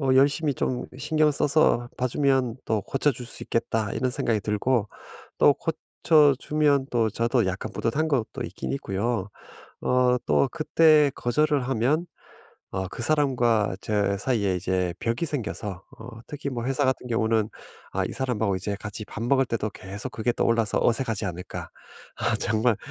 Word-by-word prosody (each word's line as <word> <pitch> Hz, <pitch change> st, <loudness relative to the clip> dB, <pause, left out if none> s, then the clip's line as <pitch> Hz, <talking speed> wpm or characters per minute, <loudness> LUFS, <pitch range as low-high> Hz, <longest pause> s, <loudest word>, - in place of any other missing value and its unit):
'어 130 Hz, -2 st, +2 dB
열심히 145 Hz, +2 st, +3 dB
좀 125 Hz, -1 st, -2 dB
신경 155 Hz, +2 st, +2 dB
써서 140 Hz, -4 st, +2 dB
봐 125 Hz, -, 0 dB
주면 130 Hz, -3 st, +1 dB
또 110 Hz, -2 st, 0 dB
고쳐 135 Hz, +7 st, +1 dB
줄 125 Hz, -2 st, -7 dB
수 -, -, -6 dB
있겠다.' 110 Hz, -2 st, -1 dB
이런 130 Hz, -, 0 dB
생각이 115 Hz, -3 st, 0 dB
들고 105 Hz, +1 st, 0 dB, 0.5 s
또 145 Hz, -, +7 dB
고쳐 155 Hz, -2 st, +2 dB
주면 145 Hz, -3 st, +2 dB
또 115 Hz, -2 st, +2 dB
저도 115 Hz, +1 st, +1 dB
약간 95 Hz, +1 st, -3 dB
뿌듯한 155 Hz, +8 st, 0 dB
것도 125 Hz, -2 st, -1 dB
있긴 -, -, -5 dB
있고요. 105 Hz, -4 st, -2 dB, 0.5 s
어 125 Hz, 0 st, +3 dB
또 140 Hz, -, +3 dB
그때 155 Hz, -2 st, +4 dB
거절을 140 Hz, +2 st, +1 dB
하면 135 Hz, +8 st, +1 dB, 0.7 s
어 95 Hz, 0 st, -2 dB
그 120 Hz, -, -7 dB
사람과 120 Hz, -8 st, +2 dB
저 100 Hz, -2 st, 0 dB
사이에 105 Hz, -5 st, 0 dB
이제 90 Hz, -1 st, -1 dB
벽이 115 Hz, +8 st, -1 dB
생겨서 105 Hz, -, -4 dB, 0.2 s
어 110 Hz, -, -10 dB, 0.2 s
특히 145 Hz, -1 st, -5 dB
뭐 120 Hz, -3 st, -4 dB
회사 135 Hz, +2 st, 0 dB
같은 130 Hz, -1 st, 0 dB
경우는 110 Hz, -2 st, +1 dB, 0.4 s
'아 -, -, 0 dB
이 -, -, -4 dB
사람하고 115 Hz, -6 st, -1 dB
이제 100 Hz, +2 st, -3 dB
같이 105 Hz, +1 st, -6 dB
밥 105 Hz, -, -7 dB
먹을 135 Hz, +2 st, +3 dB
때도 110 Hz, -3 st, -2 dB
계속 100 Hz, +6 st, -7 dB
그게 120 Hz, +2 st, 0 dB
떠올라서 115 Hz, -2 st, +1 dB
어색하지 115 Hz, -3 st, 0 dB
않을까? 90 Hz, -1 st, -6 dB, 0.5 s
아 -, -, 0 dB
정말 110 Hz, +1 st, +1 dB
120 Hz, 305 characters per minute, -25 LUFS, 110-140 Hz, 0.7 s, 또